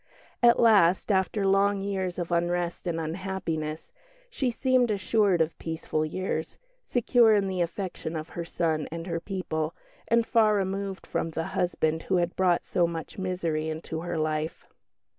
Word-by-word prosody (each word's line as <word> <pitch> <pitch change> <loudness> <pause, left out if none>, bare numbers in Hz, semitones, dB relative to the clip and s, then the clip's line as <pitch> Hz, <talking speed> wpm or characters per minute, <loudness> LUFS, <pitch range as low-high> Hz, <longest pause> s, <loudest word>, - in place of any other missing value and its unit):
At 240 -1 +6
last, 200 -4 +5
after 195 +1 +1
long 195 0 +3
years 190 -3 -2
of 175 -1 -3
unrest 175 +1 -1
and 165 -1 -1
unhappiness, 165 -2 -4 0.4
she 265 - 0
seemed 255 0 +2
assured 200 -3 +2
of 160 0 0
peaceful 160 -1 -2
years, 160 0 -3 0.3
secure 235 -2 +4
in 200 -1 +2
the 185 -2 -1
affection 170 -1 -3
of 155 +1 -5
her 170 - -5
son 160 -2 -1
and 165 0 -5
her 170 -2 -2
people, 170 -3 -3 0.3
and 235 0 +3
far 220 -2 +4
removed 195 0 -2
from 165 - -2
the 165 0 -3
husband 160 -3 0
who 190 - +3
had 175 -1 0
brought 180 -2 +2
so 175 -3 +2
much 165 +2 -6
misery 170 -4 -1
into 160 0 -5
her 175 -1 -3
life. 155 0 -2
180 Hz, 160 wpm, -27 LUFS, 165-195 Hz, 0.4 s, At